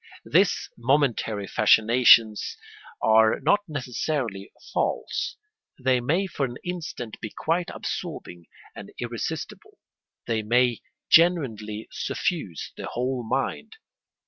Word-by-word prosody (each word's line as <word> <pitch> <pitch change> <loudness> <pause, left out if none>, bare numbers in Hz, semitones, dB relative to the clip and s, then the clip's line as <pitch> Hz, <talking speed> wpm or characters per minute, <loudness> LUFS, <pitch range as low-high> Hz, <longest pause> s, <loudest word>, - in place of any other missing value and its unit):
These - - +2
momentary 120 -5 +1
fascinations 110 +1 +4 0.5
are 110 0 +5
not 205 - +3
necessarily 125 - -3 0.2
false: - - -1 0.4
they 130 -1 +2
may 165 +11 +1
for 170 -6 -4
an 120 -2 -2
instant 160 -10 -6
be 110 - -4
quite 170 - -1
absorbing 85 -1 -6 0.3
and - - -9
irresistible; - - -5 0.5
they 115 -2 0
may 120 +2 +2 0.3
genuinely 115 -11 +3
suffuse 150 - -3
the - - -6
whole 125 +1 -2
mind. 130 - -2
120 Hz, 100 wpm, -25 LUFS, 110-145 Hz, 0.5 s, are